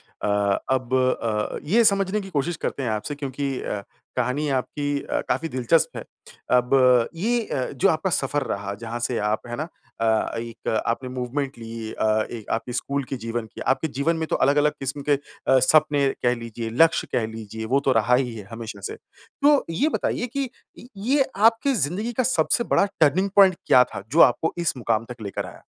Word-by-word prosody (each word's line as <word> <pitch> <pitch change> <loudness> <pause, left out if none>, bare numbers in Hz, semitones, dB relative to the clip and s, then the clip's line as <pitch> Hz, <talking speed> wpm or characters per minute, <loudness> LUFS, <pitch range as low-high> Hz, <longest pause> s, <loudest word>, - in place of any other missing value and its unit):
अ, 100 -1 -1 0.2
अब 130 -1 -4 0.3
अ, 105 -2 -1
ये 230 +4 +5
समझने 195 +1 0
की 195 - -9
कोशिश 160 +1 -1
करते 135 - -2
हैं 120 - -1
आपसे 110 +7 -3
क्योंकि 140 0 -3
अ, 100 - -3 0.3
कहानी 130 +4 0
आपकी 145 +2 -3
अ, - - -2
काफ़ी 165 - 0
दिलचस्प 130 +5 +1
है, - - -5 0.5
अब 125 -1 +4
ये 230 +8 +1
अ, 130 - -1
जो 135 - +2
आपका 160 +4 0
सफ़र 145 -2 0
रहा 100 0 -5
जहाँ 120 +2 -4
से 120 - -1
आप 110 - -3
है 120 - -4
ना 155 +5 -4 0.3
अ, 110 0 +1
एक 115 0 -7 0.2
आपने 125 +2 -2
मूवमेंट 130 +2 -3
ली 115 -1 -7
अ, - - -1 0.3
एक 115 -3 -8
आपकी 120 +2 -2
स्कूल 140 +3 -2
की 135 - -2
जीवन 115 0 -4
की - - -8
आपके 160 +4 -4
जीवन 165 +4 +1
में 160 0 -2
तो - - 0
अलग-अलग 145 +2 +3
क़िस्म 140 +2 -3
के - - +6 0.3
अ, 130 - +6
सपने 145 +1 +4 0.2
कह 125 0 +3
लीजिए, 115 -1 -6
लक्ष्य 165 - +1
कह 115 - +1
लीजिए 110 0 -7
वो - - +5
तो 135 - +4
रहा 115 +3 +4
ही 125 -2 0
है 105 -3 -8
हमेशा 115 -1 -7
से। 435 - -7 0.5
तो 290 0 +5
ये 270 - +1
बताइए 245 - -1
कि 270 -3 -1 0.3
इ 245 - -12 0.2
ये 275 +2 +4 0.2
आपकी 230 +5 +4
ज़िंदगी 205 - -1
का 255 +2 +1
सबसे 250 -1 +2
बड़ा 200 - +3
टर्निंग 170 +6 +3
पॉइंट 195 -2 +7
क्या 125 - +7
था 100 - -6
जो 165 - +2
आपको 165 - +4
इस 170 -4 0
मुक़ाम 115 -2 0
तक 120 -2 -9
लेकर 100 -2 -4
आया? - - -12
135 Hz, 200 wpm, -24 LUFS, 115-165 Hz, 0.5 s, पॉइंट